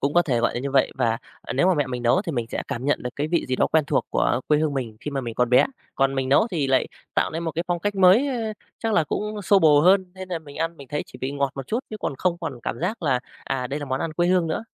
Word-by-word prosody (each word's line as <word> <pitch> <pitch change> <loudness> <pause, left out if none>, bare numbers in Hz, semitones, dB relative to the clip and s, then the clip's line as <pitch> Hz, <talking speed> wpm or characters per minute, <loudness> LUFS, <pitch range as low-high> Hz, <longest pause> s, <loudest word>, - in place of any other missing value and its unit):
Cũng 140 +2 0
có 175 - +6
thể 125 -8 0
gọi 120 - +1
là 120 - -2
như 140 +2 -3
vậy, 135 -1 +3
và, 115 0 +1 0.2
ờ, - - -5
nếu 140 +7 +2
mà 185 - +4
mẹ 145 -3 +1
mình 125 -1 -4
nấu 120 +11 +3
thì 170 - -4
mình 120 -4 -2
sẽ - - -3
cảm 120 - -4
nhận 145 - +1
được 125 - -3
cái 145 +2 -1
vị 170 +1 0
gì 130 - -1
đó - - +3
quen 160 -2 +2
thuộc - - 0
của 120 - +1
quê 150 - +4
hương 155 -2 0
mình 120 -5 -4
khi 150 - -5
mà 140 -1 -2
mình 120 -3 -5
còn 125 0 +1
bé, 125 - +6 0.3
còn 135 0 +2
mình 130 -1 -1
nấu 140 +11 +5
thì 155 -6 0
lại 130 -1 +2 0.3
tạo - - +1
nên 165 +2 -4
một 165 -1 -2
cái 170 +2 -2
phong 175 -1 +1
cách 205 +3 -1
mới, 195 +7 +6
ơ, 230 -5 -2 0.3
chắc 225 -1 -1
là 170 -7 +3
cũng 210 +6 -3
xô 200 +2 +5
bồ 150 -5 +6
hơn 185 +2 +4
nên 185 0 -8
là 175 -2 -2
mình 145 -3 -13
ăn 165 +1 -2
mình 140 -3 -12
thấy 150 - -2
chỉ - - -13
bị 130 - -3
ngọt 140 -1 0
một 135 -2 -6
chút 230 - -1
chứ 215 - -4
còn 135 - -3
không 175 -2 0
còn 145 -8 -5
cảm - - -3
giác 190 +5 -2
là, 135 -5 +2 0.2
à, 125 -2 -2
đây 140 +4 -4
là 145 - -5
món 130 0 -2
ăn 165 - -2
quê 175 +2 +1
hương 180 -2 +3
nữa. 160 +7 -2
150 Hz, 325 wpm, -24 LUFS, 135-180 Hz, 0.3 s, có